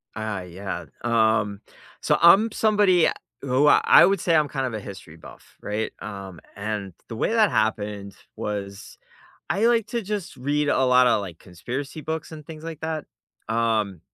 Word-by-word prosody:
I 110 -3 -4
yeah, 95 +2 -6 0.2
um, 110 -3 +1 0.4
so, - - +2
I'm 195 +7 +6
somebody 205 -6 +3 0.3
who 135 +2 +2
I 155 +2 +7
would 195 +1 +1
say 170 -1 +1
I'm 155 -2 +3
kind 135 -1 -3
of 125 - -4
a 110 - -3
history 95 -5 -10
buff, - - -16
right, 105 +1 -3
um, 95 -4 -8 0.2
and 100 -2 -4
the 115 - -7
way 115 - -1
that 220 -3 +4
happened 105 -2 -1 0.2
was- 100 -1 -6 0.5
I 200 +5 +2
like 230 -2 +2
to 235 - -2
just 200 -6 -5
read 145 +3 -1
a 130 - +2
lotta, 125 -2 +4
like, 90 -5 -7
conspiracy 125 - -6
books 160 +1 -5
and 155 -2 -10
things 160 -1 -10
like 165 -2 -7
that, 160 -1 -3 0.4
um, 110 -5 0
125 Hz, 165 wpm, -24 LUFS, 105-160 Hz, 0.5 s, I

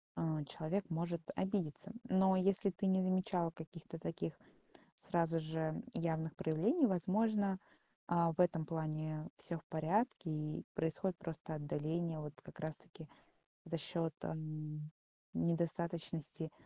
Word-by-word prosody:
э, 155 -2 +1
человек 175 +7 -1
может 170 +1 0
обидеться. 190 -1 -1 0.2
Но 190 -1 +5
если 195 +2 +4
ты 190 +2 -2
не 190 0 +5
замечала 185 -2 +2
каких-то 165 0 -8
таких 160 - -2 0.8
сразу 165 -1 +3
же 160 +3 -1
явных 160 -1 0
проявлений, 210 - +4
возможно, 200 +1 +3 0.5
а, 170 -1 +4
в 160 - -14
этом 165 -3 +4
плане 155 -1 -2
всё 170 - -4
в 160 - -13
порядке, 175 +4 +1
и 150 0 -2
происходит 165 +3 0
просто 160 -1 -5
отдаление 155 +2 -1
вот 150 -1 -5
как - - -12
раз 155 0 -2
таки 160 - -13 0.6
за 165 - -1
счёт, 165 +1 -1
м, 155 -1 -4 0.4
недостаточности 165 -1 0
165 Hz, 125 wpm, -38 LUFS, 155-185 Hz, 0.8 s, Но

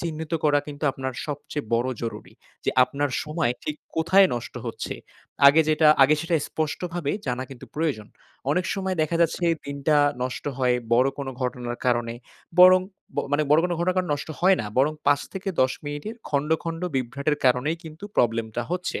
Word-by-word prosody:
চিহ্নিত 160 -1 -5
করা 145 -1 +4
কিন্তু 150 0 -6
আপনার 130 -1 -4
সবচেয়ে 145 -1 -5
বড় 120 +2 +1
জরুরি। 115 - -6 0.3
যে - - +2
আপনার 145 +1 -2
সময় 150 -6 0
ঠিক 150 - -3 0.2
কোথায় 185 +4 +5
নষ্ট 120 - -6
হচ্ছে। - - -4 0.5
আগে 145 +3 +7
যেটা, 155 0 +4
আগে 150 +3 +6
সেটা 170 0 -1
স্পষ্টভাবে 160 0 -3 0.2
জানা 125 0 -2
কিন্তু 130 -3 -10
প্রয়োজন। 150 -10 -1 0.4
অনেক 180 +4 +1
সময় 190 -1 -2
দেখা 160 +2 0
যাচ্ছে 170 +1 +1 0.2
দিনটা 140 +2 +1 0.3
নষ্ট 125 0 -4
হয় 125 -1 +3 0.2
বড় 125 +3 +4
কোন 140 - -4
ঘটনার 125 -1 -3
কারণে। 120 -1 +1 0.4
বরং, 185 0 +9 0.5
মানে 150 +1 +3
বড় 150 +2 +6
কোন 180 - 0
ঘটনা 180 +2 +1
কারণ 185 -2 0
নষ্ট 145 - -7
হয় 190 +1 +5
না। 105 - -4
বরং, 145 +4 +3
৫ 145 -1 +4
থেকে 190 0 -5
১০ 130 0 +3
মিনিটের 145 +10 -5
খন্ড, 145 +1 -1
খন্ড, 165 0 -4
বিভ্রাটের 140 +4 -1
কারণেই 130 +5 +2
কিন্তু 160 +4 -10
প্রবলেম 115 -1 +2
টা 120 - 0
হচ্ছে। 180 0 -2
150 Hz, 175 wpm, -25 LUFS, 130-165 Hz, 0.5 s, বরং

